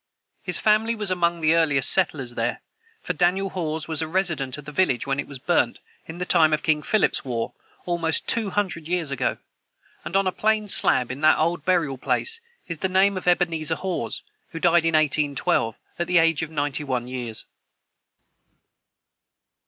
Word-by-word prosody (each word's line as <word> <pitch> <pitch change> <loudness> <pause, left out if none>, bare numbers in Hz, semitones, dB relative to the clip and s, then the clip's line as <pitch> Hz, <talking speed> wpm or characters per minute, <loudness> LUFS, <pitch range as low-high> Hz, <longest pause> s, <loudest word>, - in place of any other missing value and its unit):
His 180 - 0
family 220 +2 +2
was 210 -3 -3
among 170 -2 0
the 155 0 +3
earliest 155 -5 +3
settlers 145 -9 +1
there, - - -2 0.4
for - - -2
Daniel 180 +3 +1
Haws 160 -3 -3
was 160 -2 -2
a 160 - -2
resident 155 -7 -1
of 150 - -10
the 150 - -8
village 145 -7 +1
when 135 0 -1
it - - -3
was 140 - -9
burnt, 165 +6 +1 0.3
in 160 - -8
the 180 - -3
time 160 -4 +4
of 150 - 0
King 155 -2 +2
Philip's 215 +5 +1
war, 120 -4 -3 0.3
almost 170 -3 0
two 225 -3 +1
hundred 185 -6 -2
years 170 -4 -2
ago; 130 -2 -1 0.7
and 175 - -6
on 195 0 +3
a 185 - +1
plain 215 +1 0
slab 125 -9 +1
in 130 +3 -7
that 155 0 +5
old 170 +3 0
burial 165 -8 +1
place 460 - +2 0.3
is 170 -3 -6
the 190 - -1
name 195 +2 +3
of 185 - -6
Ebenezer 165 -3 +1
Haws, 185 +1 -3 0.3
who 165 - -7
died 170 -1 +3
in 165 -1 +2
1812, 145 -6 +1 0.2
at 175 - -1
the 180 - +3
age 165 -2 +3
of 160 - -4
ninety 145 -2 -2
one 125 -3 -2
years. 120 -3 -3
165 Hz, 185 wpm, -24 LUFS, 145-180 Hz, 0.7 s, that